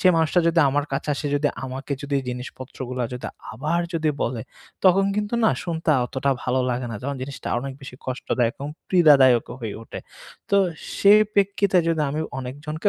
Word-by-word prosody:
সে - - +2
মানুষটা 165 +2 +3
যদি 165 0 +3
আমার 145 +2 +1
কাছে 135 - -2
আসে, 145 - -4
যদি 145 0 +2 0.2
আমাকে 135 +2 -5
যদি 145 0 -1
জিনিসপত্রগুলো 125 0 -6
যদি 125 - -5 0.3
আবার 155 +9 -1
যদি 160 -1 +1
বলে, 115 -2 -2 0.4
তখন 190 +1 +6
কিন্তু 210 +2 -1
না - - +5
শুনতে 165 -1 -4
আ - - +3
অতটাও 135 +2 0
ভালো 130 +1 +1
লাগে 125 0 -2
না 115 - -4
।যখন 140 +1 -3
জিনিসটা 135 0 -6
অনেক 135 +2 -5
বেশি 135 -2 -10
কষ্টদায়ক 125 -2 -1
এবং 145 - -3 0.2
পীড়াদায়কও 140 -11 +5
হয়ে 110 -3 -4
উঠে। - - -8 0.5
তো 200 - +4 0.4
সেই 205 +1 +7
প্রেক্ষিতে 200 -1 +2
যদি 160 -2 +1
আমি 150 - -2 0.2
অনেকজনকে 145 +7 -3
140 Hz, 175 wpm, -23 LUFS, 130-165 Hz, 0.5 s, সেই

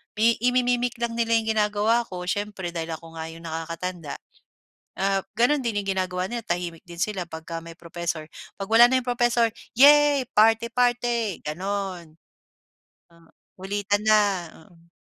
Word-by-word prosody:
mi 225 +2 +3
imi-mic 245 0 +1
lang 235 0 -2
nila 230 0 +2
yung 225 0 +1
ginagawa 215 +2 +2
ko 180 -1 -6
siyempre 195 -1 -3
dahil 165 -1 -4
ako 165 0 -13
nga 160 - -4
yung 165 +1 -12
nakakatanda, 165 0 -5 0.9
ap 195 0 +1
gano'n 250 +5 +2
din 210 -3 0
yung 200 - -8
ginagawa 185 0 -1
nila 235 -1 -5
tahimik 175 -1 -4
din 170 -1 -10
sila 195 -4 -1
pagka 165 0 -7
may 165 - -9
professor, 170 -2 -5 0.3
pag 195 - -4
wala 225 +2 +7
na 260 0 +2
yung 250 - -10
profesor, 240 -1 +2 0.2
"Yehey! 285 0 +6
Party-party," 235 -1 +2
ganon. 180 -1 -5 0.9
Tama, 170 -1 -23 0.2
kulitan 205 +2 -2
na, 215 -1 +5 0.5
oo. 170 -1 -24
205 Hz, 145 wpm, -25 LUFS, 170-235 Hz, 0.9 s, wala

